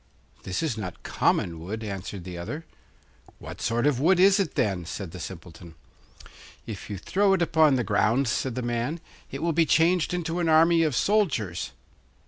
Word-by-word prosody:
'This 95 - -3
is 140 -8 -1
not 90 -4 -7
common 85 -2 0
wood,' 105 +7 -6
answered 100 -2 -6
the 90 0 -7
other. 145 - -6 0.7
'What - - -10
sort 120 +3 0
of 145 -4 +2
wood 175 +6 +3
is 195 +2 +6
it, 195 - -1
then?' 95 -4 0
said 85 +1 -6
the 90 - -9
Simpleton. 85 0 -9 0.9
'If 105 -4 -8
you 100 - -4
throw 195 - +2
it 190 - +1
upon 160 -4 +4
the 125 - 0
ground,' 115 +6 +2
said 120 +2 -1
the 125 - -3
man, 120 +7 -2 0.3
'it 135 +3 -6
will 170 -1 +1
be 165 0 +3
changed 165 +3 +3
into 175 -1 -2
an 170 -2 +1
army 165 +1 +5
of 155 -5 +1
soldiers. 130 - 0
130 Hz, 180 wpm, -26 LUFS, -, 0.9 s, is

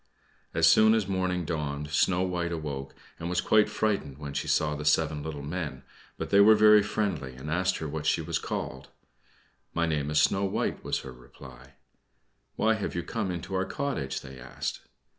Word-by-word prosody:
As - - +4
soon 110 +1 +6
as 110 -4 0
morning 90 -2 -1
dawned 75 -2 -3
Snow 90 +4 +2
White 90 -2 -2
awoke, 70 -5 -5 0.2
and 85 - -4
was 90 0 0
quite 105 +2 +4
frightened 100 -11 -1
when 70 -1 -7
she 70 - -3
saw 75 -1 +2
the 75 0 -5
seven 75 0 +2
little 75 -2 -6
men; 75 -4 -4 0.3
but - - -5
they 100 - +6
were 110 +2 +8
very 105 0 +7
friendly, 95 -11 -2
and 70 +4 -7
asked 90 +3 +1
her 80 - -4
what 75 +1 -4
she - - +3
was 80 +1 -2
called. 65 0 -5 0.9
"My 85 - +2
name 75 -3 -1
is 75 0 +2
Snow 95 +5 +3
White," 95 - -2
was - - -1
her 65 - -9
reply. 65 +1 -15 0.8
"Why 110 +1 +3
have 110 -5 -3
you 85 - -2
come 95 - -3
into 90 +1 -5
our 95 0 +1
cottage?" 95 - -3
they 65 -2 -11
asked. 60 +1 -5
80 Hz, 190 wpm, -28 LUFS, 70-95 Hz, 0.9 s, were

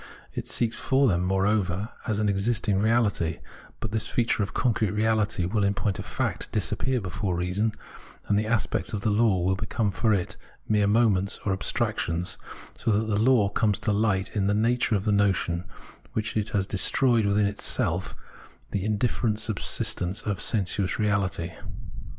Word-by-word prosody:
It - - -5
seeks 115 -2 0
for 135 0 +2
them, 90 -5 +1
moreover, 95 +1 0 0.2
as 110 -2 0
existing 105 0 +1
reality; 105 -7 +1 0.4
but 110 - -4
this 110 0 -1
feature 115 -2 0
of 100 - -2
concrete 110 -4 0
reahty 110 -4 +1
will 105 +2 0
in 100 0 +1
point 100 -2 -1
of - - -6
fact - - -3
disappear 110 +5 0
before 95 -1 -3
reason, 90 +5 -1 0.5
and 100 - +1
the 105 +1 +1
aspects 115 -2 -1
of 105 - -2
the 110 - +1
law 105 -2 +3
will 95 +1 +2
become 105 +1 -1
for 110 +5 +1
it 95 -4 -1 0.3
mere 105 -2 +2
moments 100 -3 +2
or 95 -2 +1
abstrac 110 +3 -1
tions, 85 +2 -1 0.4
so - - -3
that 110 +1 +2
the 100 - +1
law 115 -4 +4
comes 105 0 +1
to 115 -3 -1
fight 95 -3 0
in 100 -2 +1
the 105 - +2
nature 115 +1 +2
of 100 0 -2
the 105 - +2
notion, 95 -4 +1 0.5
which 110 0 -2
has 105 -2 0
destroyed 115 +3 +3
within 100 +1 +2
itself 100 +1 -1 0.6
the 100 - -1
iadifferent 110 0 0
subsistence 100 -2 +1
of 100 -4 -2
sensuous 100 -3 +1
reafity. 95 -5 -1
105 Hz, 165 wpm, -26 LUFS, 95-110 Hz, 0.6 s, law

